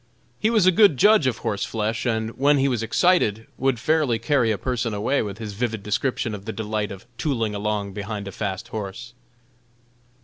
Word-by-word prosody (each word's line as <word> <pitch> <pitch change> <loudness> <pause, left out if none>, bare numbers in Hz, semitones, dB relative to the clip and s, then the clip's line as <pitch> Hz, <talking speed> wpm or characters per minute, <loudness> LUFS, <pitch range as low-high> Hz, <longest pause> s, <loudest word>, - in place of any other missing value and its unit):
He 220 - +2
was 220 -5 +3
a 185 - +7
good 200 -6 +5
judge 210 - +5
of 120 -3 0
horseflesh, 110 +1 -2
and 110 -1 -1
when 145 +4 +3
he 135 0 +2
was 125 -4 0
excited 115 - +2
would 130 -2 +1
fairly 150 -3 +2
carry 115 +1 +1
a 110 - +1
person 115 0 -2
away 130 +7 +1
with 100 -2 -5
his 110 -2 -6
vivid 110 -1 -3
description 110 +2 -1
of 100 -1 -7
the 110 - -3
delights 110 -1 -3
of 95 - -12
"tooling" 115 -8 -1
along 105 -1 -2
behind 105 0 -5
a - - -5
fast 100 +3 -4
horse. 110 +2 -6
115 Hz, 190 wpm, -23 LUFS, 105-135 Hz, -, a